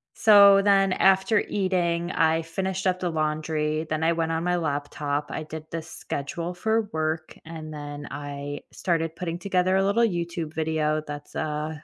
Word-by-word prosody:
So, 200 -2 +7
then 195 -2 +4
after 190 +3 +4
eating, 175 -3 0
I 160 -1 +2
finished 190 +3 -3
up 185 -1 +1
the 180 - -1
laundry, 155 0 -1
then 155 +1 -1
I 165 - +3
went 165 -1 -1
on 165 +1 -1
my 180 0 +1
laptop, 145 -2 -2
I - - -3
did 155 0 -8
the 165 0 -3
schedule 165 +2 -5
for 220 +5 +1
work, 155 0 -2
and 155 -1 -8
then 145 -1 -7
I 145 0 -5
started 165 -2 -1
putting 170 -1 -4
together 185 -1 +1
a 195 - +3
little 205 +4 +2
YouTube 170 -5 -2
video 155 -1 0
that's 145 0 -8
a 155 0 -3
165 Hz, 165 wpm, -25 LUFS, 155-185 Hz, -, So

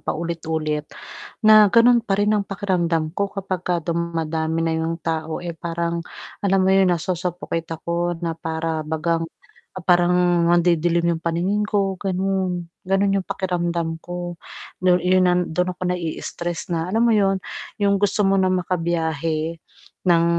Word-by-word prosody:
paulit-ulit 160 -2 -3 0.6
na, 215 -1 +8
ganun 240 +1 +6
pa 195 -4 0
rin 205 +1 +2
ang 210 -1 +1
pakiramdam 175 -5 0
ko 200 +3 -1
kapag 190 -2 -3
ka 180 - +1
dumadami 165 -1 -1
na 165 - 0
'yong 165 +1 -2
tao, 160 -1 -2
eh, 170 - -3
parang 170 0 -2 0.4
alam 195 -1 +3
mo 190 - +3
'yon 190 -1 +5
nasusuffocate 175 -1 -3
ako 170 +1 -2
na 165 - -1
para 160 0 -2
bagang 160 +2 -1 0.6
parang 175 0 +4 0.4
nandidilim 170 0 +3
'yong 160 - -11
paningin 180 +5 0
ko 195 -3 0
ganon, 185 -2 -1 0.2
ganon 195 +1 +2
yung 185 - -11
pakiramdam 170 -3 -2
ko, 175 0 -5 0.4
do'n, 180 0 +4
'yun, 185 0 +4
ah, 180 0 +3
dun 180 +2 -1
ako - - -13
nai-istress 170 0 -4
na, 165 +1 -1
alam 225 +2 +3
mo 235 - +4
'yun, 195 -1 +3 0.4
yung 200 -1 +3
gusto 205 +1 +2
mo 195 0 +3
ng 185 -1 +1
makabiyahe, 165 -2 -1 0.5
ng 170 -1 +5
175 Hz, 145 wpm, -22 LUFS, 165-190 Hz, 0.6 s, na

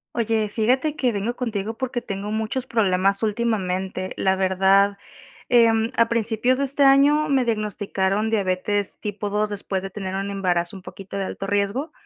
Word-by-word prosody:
Oye, 220 -2 0
fíjate 255 +8 +1
que 255 -5 +1
vengo 215 +3 -2
contigo 225 -3 -3
porque 250 -1 -3
tengo 200 0 -5
muchos 220 +4 -2
problemas 195 -4 +1
últimamente. 190 -4 -1
La 190 0 +2
verdad, 195 +1 +3 0.5
em, 230 -1 +4
a 230 0 +4
principios 230 +2 +1
de 280 - 0
este 280 +1 +1
año 285 +3 +5
me 265 -3 +2
diagnosticaron 210 -1 -1
diabetes 200 0 0
tipo 205 0 -4
2 210 +1 0
después 200 -2 -3
de 195 - -6
tener 190 -1 -5
un 195 +1 -3
embarazo 180 -2 -1
un 190 - -9
poquito 195 +2 -10
de 195 - -2
alto 195 - -5
riesgo 205 +10 -1
210 Hz, 165 wpm, -23 LUFS, 195-235 Hz, 0.5 s, año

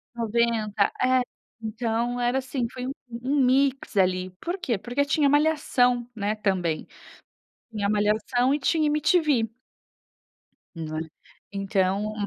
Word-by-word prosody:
90, 225 -3 +1
é. 255 0 +4 0.4
Então 230 +2 -2
era, 245 +2 +1
assim, 255 -2 -2
foi 255 0 -5
um - - -2 0.3
um 275 +3 0
mix 270 -2 +1
ali. 185 -1 +2
Por 350 +3 -3
quê? 235 - -1
Porque 245 +7 -1
tinha 285 0 +2
Malhação, 280 -5 +2
né, 210 0 -1
também. 185 -7 -1 0.9
Tinha 205 -2 -1
Malhação 215 +5 +1
e - - +2
tinha 310 +4 +2
MTV. 300 -5 +2 1.3
Não 155 -1 -5
é? - - -2 0.5
Então 195 +1 0
235 Hz, 120 wpm, -25 LUFS, 205-265 Hz, 1.3 s, é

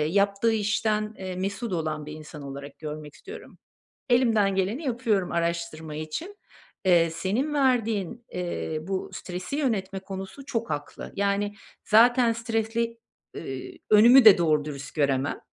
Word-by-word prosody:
yaptığı 200 +7 +2
işten, 215 0 0
eee, 185 -1 -5
mesut 200 +3 -3
olan 155 -3 -2
bir 150 - -7
insan 155 -1 -10
olarak 140 +1 -8
görmek 150 -1 -7
istiyorum. 420 +3 -11 0.5
Elimden 225 -5 +3
geleni 200 - -1
yapıyorum 230 -7 0
araştırma 170 -2 -2
için. 235 - -5 0.5
Eee, 170 -2 +5
senin 205 - -1
verdiğin, 235 - +1
eee, 175 -3 -3
bu 190 +3 -3
stresi 185 +7 -5
yönetme 195 -9 -1
konusu 195 +8 -8
çok 230 -3 -3
haklı. 145 0 -5
Yani, 200 +1 0 0.3
zaten 235 +2 +5
stresli, 230 0 -2 0.4
ııı, - - -6 0.5
önümü 235 +4 +8
de 210 -4 +10
doğru 155 -3 +2
dürüst 145 -1 -7
göremem. 140 -2 +1
195 Hz, 130 wpm, -26 LUFS, 160-230 Hz, 0.5 s, de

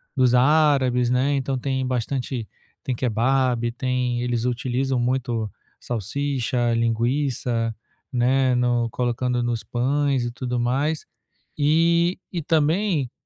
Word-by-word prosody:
dos 130 -2 +3
árabes, 130 -3 +3
né, 130 +3 +2
então 135 -1 -1
tem 130 0 -1
bastante 125 -1 -2 0.4
tem 130 -3 -2
kebab, 120 0 +1
tem 125 -2 -1
eles 120 -1 -1
utilizam 125 +1 -1
muito 120 -4 -1 0.3
salsicha, 120 +1 -1
linguiça, 115 0 0 0.4
né, 130 +1 +2
no 120 -1 +1
colocando 125 0 -1
nos 120 -1 -2
pães 135 +1 0
e 120 - -3
tudo 125 0 -3
mais 140 +6 0 0.5
e 170 +4 +3
e 175 -3 -3
também, 160 - +1
125 Hz, 115 wpm, -23 LUFS, 120-140 Hz, 0.5 s, dos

